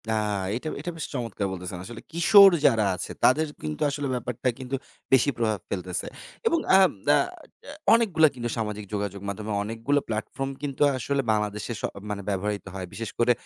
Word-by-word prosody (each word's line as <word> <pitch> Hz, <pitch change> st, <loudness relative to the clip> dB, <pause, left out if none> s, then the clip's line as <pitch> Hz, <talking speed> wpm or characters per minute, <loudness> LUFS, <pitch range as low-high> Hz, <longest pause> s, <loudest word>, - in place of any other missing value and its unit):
না, -, -, +2 dB, 0.4 s
এটা 130 Hz, +7 st, -4 dB
এটা 175 Hz, +3 st, -4 dB
বেশ 160 Hz, -, -3 dB
চমৎকার 115 Hz, -6 st, -2 dB
বলতেছেন। 90 Hz, 0 st, -6 dB
আসলে 115 Hz, +1 st, -9 dB
কিশোর 195 Hz, +4 st, +8 dB
যারা 110 Hz, -4 st, +4 dB
আছে, -, -, -5 dB
তাদের 155 Hz, +5 st, +4 dB, 0.2 s
কিন্তু 75 Hz, -1 st, -4 dB
আসলে 140 Hz, 0 st, -3 dB
ব্যাপারটা 125 Hz, +1 st, -2 dB
কিন্তু 130 Hz, +1 st, -3 dB, 0.4 s
বেশি 130 Hz, +2 st, +5 dB
প্রভাব 110 Hz, -3 st, 0 dB
ফেলতেছে 90 Hz, -2 st, -3 dB, 0.4 s
এবং 335 Hz, -7 st, +3 dB, 0.2 s
আ -, -, +9 dB, 0.3 s
না, -, -, +7 dB, 0.5 s
আ -, -, -6 dB, 0.2 s
অনেকগুলো 195 Hz, -9 st, +5 dB
কিন্তু 120 Hz, -1 st, -3 dB
সামাজিক 105 Hz, -2 st, -3 dB
যোগাযোগ 100 Hz, -1 st, -3 dB
মাধ্যমে 105 Hz, +2 st, -4 dB
অনেকগুলো 115 Hz, +7 st, 0 dB
platform 115 Hz, +5 st, -3 dB
কিন্তু 140 Hz, -2 st, -5 dB, 0.2 s
আসলে 140 Hz, +2 st, 0 dB
বাংলাদেশে 105 Hz, +1 st, -1 dB
স -, -, -19 dB, 0.3 s
মানে 105 Hz, -1 st, -3 dB
ব্যবহৃত 100 Hz, +1 st, -2 dB
হয়। 95 Hz, -1 st, -5 dB
বিশেষ 110 Hz, +1 st, -5 dB
করে 120 Hz, +1 st, +4 dB
115 Hz, 170 wpm, -26 LUFS, 105-140 Hz, 0.5 s, আ